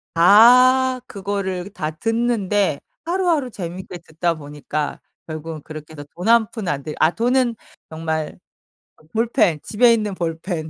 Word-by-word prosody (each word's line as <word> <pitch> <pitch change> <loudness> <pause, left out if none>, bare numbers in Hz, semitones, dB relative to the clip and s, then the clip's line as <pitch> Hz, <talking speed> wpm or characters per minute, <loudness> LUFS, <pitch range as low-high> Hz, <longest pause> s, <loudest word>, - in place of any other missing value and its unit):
다 250 +8 +6
그거를 195 -2 -4
다 165 -6 -4
듣는데 205 -4 0 0.2
하루하루 340 -6 0
재밌게 180 -1 -7
듣다 170 +2 -2
보니까 145 0 -5 0.3
결국은 155 0 -6
그렇게 155 0 -10
해서 145 -2 -8
돈 180 +3 -5
1 230 -1 +4
푼 220 -5 -6
안 140 -4 -1
들이 150 0 -6
아 155 - +4
돈은 245 0 +1 0.4
정말 160 -1 -3 0.6
어 - - -23
볼펜 225 - +2
집에 235 +8 +4
있는 210 -3 -1
볼펜 165 -1 -4
185 Hz, 265 characters per minute, -21 LUFS, 160-230 Hz, 0.6 s, 다